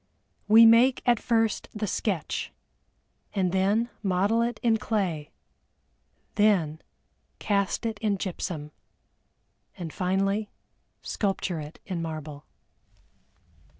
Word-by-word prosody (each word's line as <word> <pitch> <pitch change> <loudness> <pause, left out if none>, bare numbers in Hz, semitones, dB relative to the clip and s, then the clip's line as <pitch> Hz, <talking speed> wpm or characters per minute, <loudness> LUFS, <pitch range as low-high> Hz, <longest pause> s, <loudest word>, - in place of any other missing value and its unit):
We 225 +2 +8
make 235 +3 +5
at 240 -3 +4
first 225 -2 0
the 210 0 -2
sketch, 190 -4 -2 0.8
then 195 +5 +1
model 200 +4 +1
it 235 -1 -1
in 230 -2 +3
clay, 190 -9 -2 1.0
then 185 -8 +2 0.6
cast 200 +1 0
it 220 -2 -3
in 210 -3 0
gypsum, 170 -5 -4 1.1
and 165 -3 -6
finally 195 +3 0 0.5
sculpture 195 -4 -2
it 150 +1 -9
in 180 -3 -3
marble. 155 -3 -6
200 Hz, 95 wpm, -27 LUFS, 175-220 Hz, 1.1 s, We